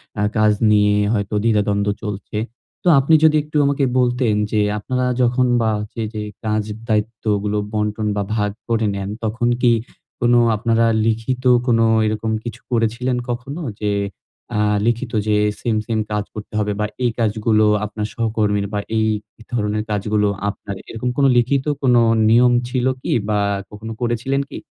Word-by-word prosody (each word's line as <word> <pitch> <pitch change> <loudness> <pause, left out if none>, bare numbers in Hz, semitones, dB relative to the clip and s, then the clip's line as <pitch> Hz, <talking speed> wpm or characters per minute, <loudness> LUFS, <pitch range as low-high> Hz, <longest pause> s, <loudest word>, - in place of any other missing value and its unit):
অ্যা 105 - 0
কাজ 110 0 +4 0.2
নিয়ে 105 0 +4 0.2
হয়তো 100 -1 -2
দ্বিধাদ্বন্দ্ব 105 -2 +1
চলছে। 105 0 -5 0.5
তো - - -2
আপনি 140 +4 +2
যদি 155 -1 +6
একটু 150 0 -4
আমাকে 140 0 +1 0.2
বলতেন 125 -2 +2 0.2
যে 110 - +1 0.2
আপনারা 125 +4 -2 0.2
যখন 125 +1 +2
বা 110 -1 +2 0.2
যে, 115 - -3
যে 105 - -4 0.2
কাজ 110 0 0 0.3
দায়িত্বগুলো 105 -1 0 0.2
বন্টন 105 0 -1
বা 100 - 0
ভাগ 105 -2 0 0.2
করে 115 -1 +1
নেন, 100 0 -4
তখন 120 +2 0
কি 120 - +6 0.5
কোনো 120 0 +4 0.2
আপনারা 115 +2 +2 0.2
লিখিত 115 +3 -1 0.2
কোনো 115 -1 +3 0.2
এরকম 110 +1 -1
কিছু 120 - -6
করেছিলেন 120 +2 0
কখনো? 135 +7 -4 0.2
যে 105 -1 0 0.6
আ - - +1 0.3
লিখিত 120 +1 0 0.2
যে 105 - +3 0.2
সেইম, 115 -2 0
সেইম 110 -1 -1
কাজ 105 -1 0
করতে 105 0 -8
হবে 105 0 0
বা 105 - +1 0.2
এই 120 - +2
কাজগুলো 110 0 +2 0.2
আপনার 105 0 -4
সহকর্মীর 105 -3 0
বা 105 - 0 0.2
এই 110 - +2 0.4
এধরনের 105 -2 -2
কাজগুলো 105 0 +1 0.2
আপনার 100 0 -5
এরকম 120 +2 -3
কোনো 140 -1 +4
লিখিত 130 +3 +2 0.2
কোনো 125 -3 +4 0.3
নিয়ম 120 +2 +5 0.2
ছিলো 130 0 +1
কি - - -3 0.2
বা 105 - +2 0.3
কখনো 110 +2 -8
করেছিলেন 125 +4 0
কি? - - -7
110 Hz, 160 wpm, -20 LUFS, 105-120 Hz, 0.6 s, যদি